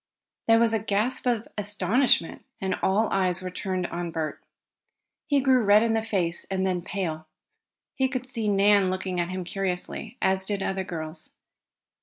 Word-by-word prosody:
There 225 0 +6
was 230 -1 +3
a 225 - +2
gasp 220 +5 -1
of 235 -3 0
astonishment, 205 0 +1 0.2
and 190 -1 -1
all 210 +4 +2
eyes 185 -2 +1
were 185 - -4
turned 185 -1 -2
on 175 0 -4
Bert. 160 -2 -4 0.8
He 285 -3 +3
grew 260 -2 +4
red 210 0 +5
in 230 -1 +1
the 225 - +1
face, 180 -6 0
and 190 -1 0
then 180 -2 0
pale. 165 -4 -4 0.7
He 265 - +1
could 255 -1 -3
see 230 -4 -1
Nan 200 -1 +4
looking 185 -1 -2
at 175 0 0
him 185 0 -3
curiously, 195 +5 -3
as 190 0 +2
did 200 -2 -1
other 190 0 -1
girls. 160 -2 -6
195 Hz, 170 wpm, -26 LUFS, 180-225 Hz, 0.8 s, There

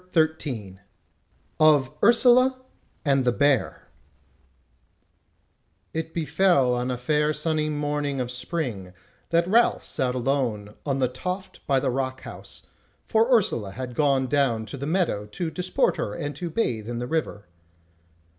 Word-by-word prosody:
CHAPTER 160 -3 +4
13 110 -12 -7 0.8
Of 150 -4 +5
Ursula 250 +3 +5 0.5
and 135 -2 +3
the 125 - +3
Bear 145 0 +1 2.1
It 160 0 -3
befell 155 -4 +2
on 125 +1 -1
a 125 - -2
fair 150 +4 +1
sunny 155 0 0
morning 145 -2 -2
of 125 -1 -2
spring, 125 - -3 0.4
that 170 0 +2
Ralph 230 +5 +3
sat 125 -1 -1
alone 120 -6 -1
on 135 -1 0
the 130 -2 +2
toft 180 +10 -6
by 135 -1 +3
the 130 - 0
rock 130 0 -3
house, - - -10 0.4
for 225 +3 +2
Ursula 120 - +2
had 125 +1 -6
gone 135 -1 +2
down 125 -4 +1
the 140 +4 -6
meadow 160 - 0
to 160 - -4
disport 180 +1 0
her 105 - -3
and 145 0 -4
to 175 -2 -4
bathe 120 - -2
in 120 - -3
the 120 - -3
river. 150 -8 -3
140 Hz, 140 wpm, -25 LUFS, 125-160 Hz, 2.1 s, Of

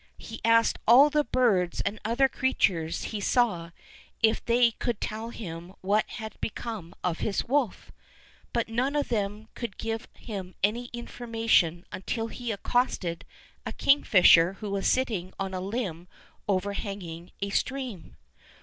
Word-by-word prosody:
He 225 - -9
asked 230 0 +4
all 270 +6 +8
the 300 0 +3
birds 210 -9 +2
and 205 +2 -2
other 235 +5 +3
crea 260 0 -1
tures 165 -3 +1
he 215 - -4
saw 200 -7 +1 0.5
if 220 0 +3
they 235 0 +4
could 230 0 -3
tell 220 +2 -4
him 175 -5 -8
what 205 +3 +1
had 220 -2 -8
become 210 -5 -5
of 175 -2 -1
his 200 - -1
wolf, 265 -5 0 0.6
but 235 -1 0
none 250 +5 0
of 290 - 0
then 210 -1 -2
could 235 -6 -6
give 225 0 -3
him 190 -5 -7
any 230 +4 +1
information 225 -8 0
until 225 +4 -3
he 240 -1 -4
accosted 200 -6 -1 0.4
a - - -4
kingfisher 185 -10 +6
who 205 0 -6
was 200 -1 0
sitting 210 -8 0
on 195 -1 -3
a 185 - -3
limb 190 -4 -3 0.4
over 200 0 0
hanging 180 -5 -6
a 200 0 -2
stream. 255 -7 -3
215 Hz, 150 wpm, -28 LUFS, 185-235 Hz, 0.6 s, all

